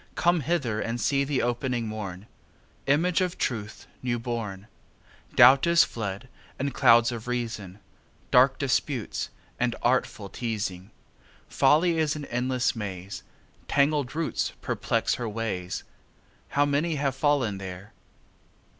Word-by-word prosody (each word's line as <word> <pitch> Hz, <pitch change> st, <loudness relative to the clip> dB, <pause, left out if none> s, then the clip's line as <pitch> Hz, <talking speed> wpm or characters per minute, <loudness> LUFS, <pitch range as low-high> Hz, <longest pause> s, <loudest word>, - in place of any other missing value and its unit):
come 175 Hz, 0 st, +3 dB
hither 135 Hz, -8 st, -1 dB
And 115 Hz, +1 st, -3 dB
see 140 Hz, +5 st, +2 dB
the 140 Hz, -1 st, 0 dB
opening 120 Hz, 0 st, -1 dB
morn, 100 Hz, -3 st, -6 dB, 0.6 s
Image 170 Hz, +6 st, +3 dB
of 180 Hz, -2 st, -1 dB
Truth 110 Hz, -3 st, -3 dB, 0.2 s
new 120 Hz, -1 st, -1 dB
born. 115 Hz, -5 st, -4 dB, 0.7 s
Doubt 130 Hz, +6 st, +7 dB
is 170 Hz, 0 st, +6 dB
fled, 105 Hz, +1 st, -5 dB, 0.3 s
and 140 Hz, 0 st, -2 dB
clouds 115 Hz, +1 st, +5 dB
of 115 Hz, -1 st, -6 dB
reason, 115 Hz, -6 st, -4 dB, 0.5 s
Dark -, -, +5 dB
disputes -, -, -1 dB, 0.3 s
and 120 Hz, -1 st, +1 dB
artful 120 Hz, -4 st, +1 dB
teazing. 105 Hz, -4 st, -4 dB, 0.6 s
Folly 165 Hz, +2 st, +3 dB
is 155 Hz, 0 st, +1 dB
an 150 Hz, -1 st, -5 dB
endless 125 Hz, 0 st, 0 dB
maze; 95 Hz, -3 st, -6 dB, 0.5 s
Tangled 140 Hz, -1 st, +1 dB
roots 165 Hz, -1 st, -1 dB
perplex -, -, 0 dB
her 115 Hz, -, -2 dB
ways; 105 Hz, -5 st, -3 dB, 0.6 s
How 145 Hz, 0 st, +2 dB
many 150 Hz, +3 st, 0 dB
have 140 Hz, -2 st, 0 dB
fallen 135 Hz, -8 st, +1 dB
there! 95 Hz, +2 st, -8 dB
120 Hz, 125 wpm, -27 LUFS, 110-145 Hz, 0.7 s, Doubt